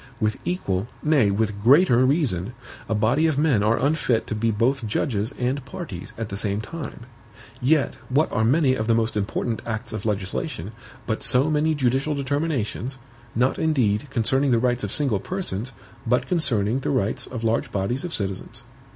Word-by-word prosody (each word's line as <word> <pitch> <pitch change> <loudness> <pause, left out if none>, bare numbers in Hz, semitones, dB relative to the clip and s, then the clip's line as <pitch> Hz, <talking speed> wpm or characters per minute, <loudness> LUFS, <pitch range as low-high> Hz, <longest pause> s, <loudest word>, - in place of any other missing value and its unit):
With 110 -1 0
equal, 100 - -1 0.2
nay 150 -9 +4
with 100 0 -1
greater 130 - +5
reason, 125 - +1 0.4
a 110 - +1
body 120 +10 +3
of 155 -3 0
men 145 -8 +3
are 110 +2 +3
unfit 135 -5 +1
to - - -4
be 110 +1 0
both 115 +3 +1
judges 105 +1 -1
and 130 +2 -1
parties 135 - -7
at 115 -2 -4
the 100 - -4
same 100 -1 0
time; 145 +4 -7 0.6
yet 140 +3 +2 0.2
what 145 +5 +2
are 110 - +1
many 135 +3 +3
of 110 -4 -2
the 115 - +4
most 115 -1 0
important 110 +3 -2
acts 115 +1 -4
of 110 -2 -4
legislation, 100 -3 -2 0.3
but 110 -2 -2
so 135 +5 +4
many 155 +1 +2
judicial 135 +2 +1
determinations, 140 -3 -2 0.4
not 125 +3 +1
indeed 130 -6 +1
concerning 135 +2 +1
the 120 - +4
rights 120 0 +1
of 105 - -3
single 130 -8 +1
persons, 135 - -2 0.4
but 125 +2 +2
concerning 125 - +1
the - - -3
rights 115 -6 0
of 120 -3 -6
large 115 0 0
bodies 100 +7 -1
of 175 - -4
citizens? 100 - -4
120 Hz, 175 wpm, -24 LUFS, 110-140 Hz, 0.6 s, greater